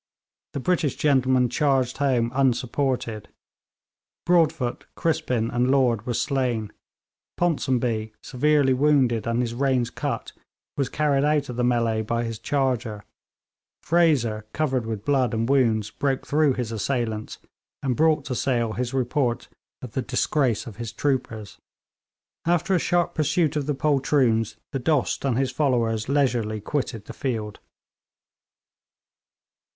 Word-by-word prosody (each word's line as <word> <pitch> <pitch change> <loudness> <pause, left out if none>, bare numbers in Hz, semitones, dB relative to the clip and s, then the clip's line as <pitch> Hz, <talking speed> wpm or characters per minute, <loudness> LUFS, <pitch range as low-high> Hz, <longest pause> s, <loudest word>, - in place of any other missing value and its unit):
The - - -3
British 155 -2 0
gentlemen 130 -3 +3
charged 130 -1 +1
home 125 -5 +1
unsupported. 125 -3 0 1.0
Broadfoot, 160 -8 +1
Crispin 125 -8 0
and 120 +1 +1
Lord 125 -5 +2
were 120 - -1
slain; 125 -7 -1 0.7
Ponsonby, 125 -9 0
severely 140 0 +2
wounded 130 -5 +2
and 115 +1 +1
his 120 -2 -2
reins 130 -1 0
cut, - - -4 0.4
was 140 -2 -1
carried 145 -2 +1
out 150 -2 +1
of 125 - -5
the 125 - -1
mêlée 115 -2 +1
by 115 +2 -1
his 115 -2 -5
charger; 125 -7 -1 0.8
Fraser, 135 -11 +2
covered 130 -6 -1
with 110 -2 -5
blood 130 -5 +2
and 115 +1 0
wounds, 115 -6 +2
broke 135 +2 -1
through 150 -2 +2
his 125 -3 -3
assailants, 110 -1 -2 0.5
and 130 -3 0
brought 155 -1 +2
to 135 - -3
Sale 120 -3 0
his 125 +2 -3
report 125 -1 0 0.3
of 125 - -7
the 130 - -2
disgrace 125 -1 0
of 110 -4 -10
his 115 -2 -5
troopers. 120 -7 -3 0.9
After 175 +2 +2
a 180 - +3
sharp 175 +1 +1
pursuit 155 0 +1
of 145 -2 -1
the 150 - 0
poltroons, 135 -6 +1 0.2
the 135 - -2
Dost 140 +1 0
and 130 -4 +1
his 130 -1 0
followers 120 -5 0
leisurely 120 -6 +1
quitted 115 -2 -3
the - - -8
field. 110 -6 -4
130 Hz, 135 wpm, -24 LUFS, 115-140 Hz, 1.0 s, gentlemen